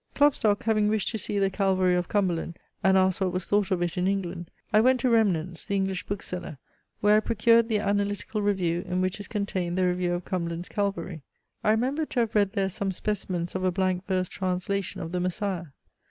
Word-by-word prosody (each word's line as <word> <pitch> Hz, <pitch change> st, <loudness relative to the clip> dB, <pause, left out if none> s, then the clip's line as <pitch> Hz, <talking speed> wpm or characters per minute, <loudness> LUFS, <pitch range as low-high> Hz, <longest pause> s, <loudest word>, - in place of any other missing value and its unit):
"Klopstock 245 Hz, -8 st, +3 dB
having 215 Hz, -1 st, +2 dB
wished 215 Hz, -1 st, 0 dB
to 220 Hz, -, -3 dB
see 205 Hz, -, -2 dB
the 195 Hz, -1 st, +2 dB
CALVARY 190 Hz, -2 st, +2 dB
of 180 Hz, -1 st, 0 dB
Cumberland, 175 Hz, -4 st, -1 dB, 0.3 s
and 190 Hz, 0 st, +5 dB
asked 185 Hz, 0 st, +2 dB
what 185 Hz, -1 st, +1 dB
was 185 Hz, 0 st, -2 dB
thought 205 Hz, -1 st, +1 dB
of 180 Hz, -3 st, +1 dB
it 175 Hz, +1 st, -2 dB
in 180 Hz, -, +1 dB
England, 180 Hz, -3 st, -2 dB, 0.2 s
I 215 Hz, -, +6 dB
went 255 Hz, +2 st, +4 dB
to 250 Hz, -, +2 dB
Remnant's 185 Hz, -7 st, +1 dB
(the 200 Hz, -, -2 dB
English 190 Hz, -2 st, -1 dB
bookseller) 180 Hz, -6 st, -5 dB, 0.4 s
where 210 Hz, +1 st, +5 dB
I -, -, +6 dB
procured 230 Hz, +1 st, +3 dB
the 220 Hz, -, +2 dB
Analytical 205 Hz, +1 st, -1 dB
Review, 180 Hz, -4 st, 0 dB
in 180 Hz, +1 st, 0 dB
which 185 Hz, +2 st, -1 dB
is 205 Hz, -, -7 dB
contained 185 Hz, -4 st, -2 dB
the 185 Hz, -, +3 dB
review 180 Hz, 0 st, 0 dB
of 175 Hz, 0 st, -3 dB
Cumberland's 170 Hz, -2 st, -3 dB
CALVARY. 195 Hz, -5 st, -2 dB, 0.4 s
I -, -, +2 dB
remembered 260 Hz, +8 st, +1 dB
to 245 Hz, -, +1 dB
have 225 Hz, -2 st, -1 dB
read 200 Hz, -2 st, +2 dB
there 195 Hz, -3 st, 0 dB
some 195 Hz, +1 st, -2 dB
specimens 185 Hz, -3 st, -2 dB
of 185 Hz, -, -2 dB
a 185 Hz, -, +3 dB
blank 185 Hz, 0 st, -1 dB
verse 185 Hz, -1 st, 0 dB
translation 185 Hz, +1 st, -2 dB
of 165 Hz, -, -5 dB
THE 180 Hz, -, -1 dB
MESSIAH. 180 Hz, -3 st, -2 dB
190 Hz, 210 wpm, -27 LUFS, 180-210 Hz, 0.4 s, I